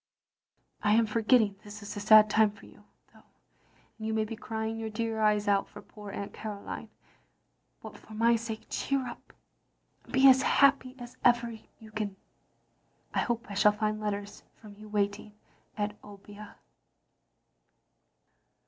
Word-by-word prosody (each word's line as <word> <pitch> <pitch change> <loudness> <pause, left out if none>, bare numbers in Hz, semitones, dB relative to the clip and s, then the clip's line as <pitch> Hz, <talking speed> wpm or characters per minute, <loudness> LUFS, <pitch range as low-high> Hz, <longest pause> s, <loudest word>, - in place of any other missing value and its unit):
I 210 0 +3
am 230 0 +4
forgetting 215 -1 +2
this 210 0 -10
is 205 - -7
a - - -4
sad 215 +1 +7
time 215 0 +4
for 205 -1 -15
you, 210 - -18 0.3
though, - - -19 0.8
and 220 - -4
you 220 - -1
may 220 0 +1
be 225 - -6
crying 220 0 -4
your 225 -1 -4
dear 220 0 -3
eyes 210 0 +2
out 200 -1 +2
for - - -11
poor 210 -1 -12
Aunt 200 0 -6
Caroline. 210 -2 -7 0.9
But 210 -2 -10
for 215 - -13
my 230 +2 +4
sake 225 -1 -5
cheer 275 -2 -1
up, 240 - -11 0.7
and - - -16
be 265 +1 +6
as 265 0 +7
happy 270 -1 +3
as 245 -1 -11
ever 240 -1 +3 0.3
you 220 -1 -14
can. 210 -2 -4 1.0
I - - +1
hope 240 -2 -1
I 205 - -7
shall 210 +1 +4
find 215 0 -1
letters 205 -1 -4 0.2
from 210 -2 -13
you 215 +1 -13
waiting 205 0 -2 0.4
at 210 0 -3
Obbia. 205 +1 -12
215 Hz, 155 wpm, -29 LUFS, 205-230 Hz, 1.0 s, sad